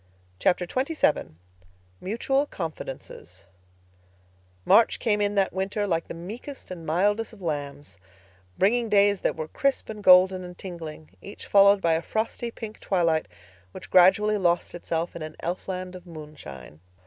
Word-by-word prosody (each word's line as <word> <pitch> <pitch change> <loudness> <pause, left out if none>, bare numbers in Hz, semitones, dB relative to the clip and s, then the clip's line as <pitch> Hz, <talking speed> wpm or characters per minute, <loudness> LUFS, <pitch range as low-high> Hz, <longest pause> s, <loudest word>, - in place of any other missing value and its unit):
Chapter 180 - +2
XXVII 260 - 0 0.6
Mutual 270 - 0
Confidences 130 - -7 1.2
March 230 - +5
came 210 -2 0
in 205 0 0
that 195 -1 +1
winter 195 +2 -1
like 165 -4 -1
the - - -7
meekest 215 - -9
and 170 -3 -8
mildest 205 +8 +1
of 210 - -15
lambs, 145 - -5 0.6
bringing 230 +4 +2
days 205 -1 +4
that - - 0
were 155 -1 -5
crisp 275 - -1
and 210 -1 -7
golden 185 0 +6
and 180 0 -10
tingling, 160 -4 -8
each 200 - -10
followed 200 0 +5
by 165 -2 +2
a 160 - +1
frosty 225 +4 -3
pink 225 -2 -9
twilight 165 -4 +1 0.5
which - - -10
gradually 205 +4 +5
lost 175 -2 +1
itself 170 -1 -3
in 170 - -7
an 155 0 -7
elfland 185 +1 -4
of 180 0 -12
moonshine. 140 - -11
185 Hz, 145 wpm, -26 LUFS, 165-205 Hz, 1.2 s, golden